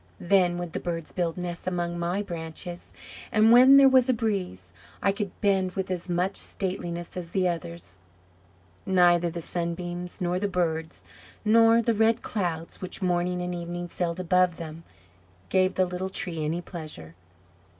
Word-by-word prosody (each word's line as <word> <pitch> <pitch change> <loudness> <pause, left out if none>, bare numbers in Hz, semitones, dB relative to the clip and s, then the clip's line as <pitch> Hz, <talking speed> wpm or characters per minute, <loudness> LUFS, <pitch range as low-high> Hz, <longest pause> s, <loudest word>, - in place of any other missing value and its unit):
Then 175 -1 +3
would 175 -2 -5
the - - -2
birds 165 -2 -4
build 170 -2 -2
nests 175 0 -5
among 175 -1 -2
my 175 +4 -1
branches; 175 -1 -7 0.4
and 220 +1 +5
when 255 +3 +8
there 275 -1 +8
was 260 -1 +4
a - - +5
breeze, 185 - -3 0.3
I 195 - +2
could 200 0 -3
bend 190 -3 +2
with 190 -1 -3
as 180 0 -4
much 180 +3 0
stateliness 175 -3 -4
as 175 -2 -6
the 185 0 +1
others!" 90 - -5 0.9
Neither 175 -2 +4
the 170 +1 -5
sunbeams, 175 +1 -4
nor 180 0 0
the 205 - 0
birds, 165 -4 -2 0.4
nor 225 +1 +5
the 230 - +2
red 225 +2 +2
clouds, 170 -5 -3
which 185 +1 -5
morning 180 0 0
and 180 0 -3
evening 175 0 -5
sailed 175 0 -3
above 180 -1 +2
them, 165 0 -8 0.7
gave 185 0 +2
the 185 - +3
little 180 +1 -4
Tree 170 -4 -3
any 165 +3 -1
pleasure. 155 - -8
180 Hz, 160 wpm, -26 LUFS, 170-190 Hz, 0.9 s, when